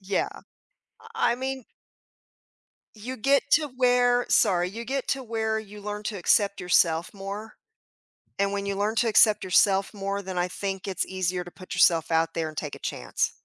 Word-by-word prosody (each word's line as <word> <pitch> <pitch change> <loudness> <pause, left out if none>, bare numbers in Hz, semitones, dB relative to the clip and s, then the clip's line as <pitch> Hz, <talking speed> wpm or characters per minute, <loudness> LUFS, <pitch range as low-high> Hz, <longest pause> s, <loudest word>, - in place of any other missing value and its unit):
Yeah, 195 0 -1 0.9
I 455 - +2
I - - -1
mean 265 0 -4 1.3
you 235 +4 -7
get 275 +5 +2
to 300 -1 +4
where 245 -1 +2
sorry, 180 -4 +3
you 225 +5 -7
get 270 +2 -3
to 270 - -1
where 220 -2 -1
you 210 -1 -10
learn 210 0 -5
to 210 0 -4
accept 200 +2 +2
yourself 170 -1 +2
more 200 +3 -7 0.8
and 200 0 +1
when 200 0 -3
you 200 0 -2
learn 205 +3 -1
to 235 +1 +2
accept 215 -1 +5
yourself 195 +2 +3
more, 200 0 -3
then 190 -2 -6
I 175 0 +1
think 195 +1 -5
it's 190 - -1
easier 185 -1 -2
to 175 - -12
put 185 - -10
yourself 165 -2 +4
out 165 0 +1
there 160 -1 -2
and 155 - -13
take 150 -2 -4
a - - -12
chance. - - -2
200 Hz, 185 wpm, -26 LUFS, 185-230 Hz, 1.3 s, accept